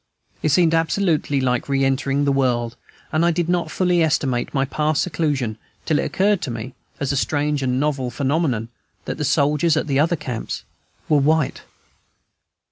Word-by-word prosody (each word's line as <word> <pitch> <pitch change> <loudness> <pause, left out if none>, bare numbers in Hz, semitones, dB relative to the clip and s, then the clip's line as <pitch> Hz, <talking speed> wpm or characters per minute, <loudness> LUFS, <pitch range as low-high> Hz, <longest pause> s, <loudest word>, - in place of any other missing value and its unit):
It 155 - +1
seemed 165 +1 +4
absolutely 165 -3 +1
like 125 0 0
re 135 -1 +2
entering 135 +1 +1
the 140 - +3
world; 120 -3 0 0.4
and 155 +1 +2
I 170 - +4
did 170 0 0
not 175 -1 0
fully 180 -2 +1
estimate 135 -6 0
my 135 -1 +1
past 150 +2 0
seclusion 140 -10 -1 0.3
till 155 -2 +2
it - - 0
occurred 200 -1 +1
to 155 - -3
me, 120 +2 -6 0.3
as 140 - -1
a - - -1
strange 145 +1 0
and 130 -1 0
novel 140 -3 0
phenomenon, 135 -4 -1 0.4
that - - -4
the - - -1
soldiers 150 +3 +2
at - - 0
the 140 -3 0
other 165 +3 +3
camps 125 -7 -5 0.4
were 150 - +4
white. 155 +1 +1
145 Hz, 175 wpm, -21 LUFS, 130-160 Hz, 0.4 s, seemed